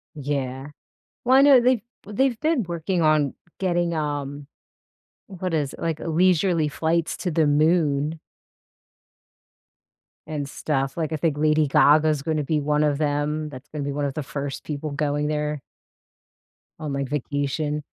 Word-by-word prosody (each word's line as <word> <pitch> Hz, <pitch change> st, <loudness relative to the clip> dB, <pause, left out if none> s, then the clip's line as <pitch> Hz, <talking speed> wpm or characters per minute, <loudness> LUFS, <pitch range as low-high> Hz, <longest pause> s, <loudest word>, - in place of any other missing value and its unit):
Yeah. 135 Hz, -2 st, -3 dB, 0.6 s
Well, 260 Hz, +2 st, +5 dB
I -, -, +7 dB
know, 280 Hz, -3 st, +7 dB
they've 250 Hz, -1 st, +2 dB, 0.2 s
they've 235 Hz, +4 st, 0 dB
been 315 Hz, -4 st, +2 dB
working 170 Hz, +1 st, -2 dB
on 155 Hz, -3 st, +3 dB, 0.2 s
getting, 175 Hz, -2 st, 0 dB
um 145 Hz, -2 st, -3 dB, 0.8 s
what 185 Hz, -2 st, -4 dB
is 145 Hz, -3 st, -1 dB
like, 165 Hz, -2 st, -2 dB
leisurely 170 Hz, -1 st, +2 dB
flights 160 Hz, +2 st, -1 dB
to 180 Hz, -, -3 dB
the 155 Hz, 0 st, +3 dB
Moon 155 Hz, 0 st, +2 dB, 2.1 s
and 150 Hz, -3 st, -4 dB
stuff. 135 Hz, -2 st, -2 dB
Like, 160 Hz, -2 st, -2 dB
I -, -, 0 dB
think 155 Hz, -1 st, 0 dB
Lady 155 Hz, 0 st, +3 dB
Gaga's 150 Hz, +1 st, +4 dB
gonna 155 Hz, 0 st, -1 dB
be 150 Hz, +1 st, 0 dB
one 150 Hz, +1 st, +1 dB
of 145 Hz, -1 st, +2 dB
them, 150 Hz, +1 st, -1 dB
that's 145 Hz, 0 st, -11 dB
gonna 150 Hz, -2 st, -5 dB
be 140 Hz, -, -2 dB
one 145 Hz, +1 st, -2 dB
of 140 Hz, -1 st, -2 dB
the 155 Hz, -, -3 dB
1st 140 Hz, 0 st, -5 dB
people 150 Hz, 0 st, -4 dB
going 145 Hz, 0 st, -1 dB
there 150 Hz, -1 st, -2 dB, 1.2 s
on, 155 Hz, -3 st, -4 dB
like, 140 Hz, -1 st, -2 dB
vacation. 145 Hz, +2 st, -2 dB
150 Hz, 145 wpm, -24 LUFS, 145-165 Hz, 2.1 s, I